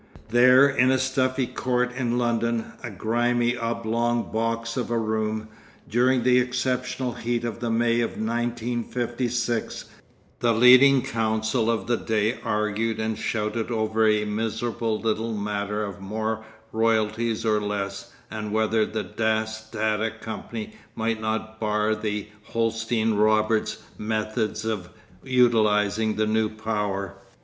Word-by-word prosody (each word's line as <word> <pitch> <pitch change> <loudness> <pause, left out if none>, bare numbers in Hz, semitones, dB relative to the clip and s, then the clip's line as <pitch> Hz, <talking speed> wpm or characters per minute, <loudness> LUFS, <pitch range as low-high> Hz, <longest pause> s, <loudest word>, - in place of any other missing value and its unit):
There 125 +4 +7
in 130 -2 +3
a 130 - +4
stuffy 130 0 +1
court 125 0 -1
in 120 -2 0
London, 115 -1 0
a 120 - -5
grimy 120 +4 +1
oblong 115 0 -1
box 115 +1 -1
of 125 -3 -2
a 120 - 0
room, 110 -1 -1 0.4
during 125 +2 +2
the 125 0 +5
exceptional 125 0 -1
heat 120 0 -2
of 115 -1 -4
the 120 -1 -2
May 115 +1 +2
of 115 - -3
1956, 120 +1 -2 0.5
the 120 -1 +3
leading 130 +3 +7
counsel 110 0 0
of 115 -1 0
the 120 -1 +1
day 110 +1 0
argued 105 +1 -1
and 110 0 -1
shouted 110 +1 -2
over 110 -1 +1
a 105 0 +2
miserable 110 +1 -2
little 115 0 -1
matter 105 0 -2
of 100 -1 -8
more 110 +2 -3 0.3
royalties 110 0 +1
or 105 -1 +2
less 100 -1 -4 0.2
and 105 -1 -4
whether 110 0 +2
the 110 - -3
Dass 110 0 -2
Tata 110 0 0
company 110 0 -6 0.2
might 110 -1 -1
not 110 0 -3
bar 105 0 +1
the 105 -1 -3 0.2
Holsten 115 -1 0
Roberts' 110 +1 +2 0.2
methods 110 0 -2
of 105 -5 -3 0.3
utilising 110 -4 +3
the 110 - +1
new 110 0 +1
power. 105 -3 -3
110 Hz, 130 wpm, -25 LUFS, 110-120 Hz, 0.5 s, There